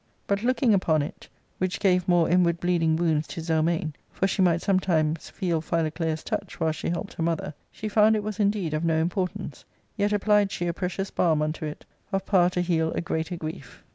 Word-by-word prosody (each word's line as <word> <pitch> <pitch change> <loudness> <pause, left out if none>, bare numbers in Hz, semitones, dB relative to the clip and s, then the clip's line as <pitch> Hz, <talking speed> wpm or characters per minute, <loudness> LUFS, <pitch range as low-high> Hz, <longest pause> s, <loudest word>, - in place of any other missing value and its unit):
But, 200 0 0
looking 240 -1 +2
upon 160 -6 +2
it, 145 - -8 0.3
which 185 -1 -1
gave 180 -2 +2
more 175 -2 +4
inward 170 -1 +3
bleeding 170 -3 +2
wounds 160 -2 +1
to 175 - -7
Zelmane, 160 -1 0 0.2
for - - 0
she 195 0 0
might 170 -2 +3
some 195 -2 +3
times 160 -4 0
feel 170 -4 -1
Phiioclea's 160 0 -1
touch 205 -4 -4
while 160 -1 +2
she 155 - -4
helped 175 +4 -3
her - - -6
mother, 165 -2 -1 0.2
she 215 - -6
found 215 +1 +4
it 210 - -1
was 215 0 -5
indeed 200 -6 +1
of 155 +2 -1
no 165 -1 +2
importance; 175 +3 -2 0.3
yet 205 0 +2
apphed 210 -1 +3
she 175 - -3
a 170 - 0
precious 185 +2 -3
balm 160 -4 +2
unto 155 +1 -3
it, 150 0 -7 0.3
of 195 -1 -1
power 180 -3 +4
to 180 0 -1
heal 165 -2 +1
a - - -1
greater 165 +1 -2
grief. 155 -6 -8
175 Hz, 205 wpm, -26 LUFS, 160-195 Hz, 0.3 s, more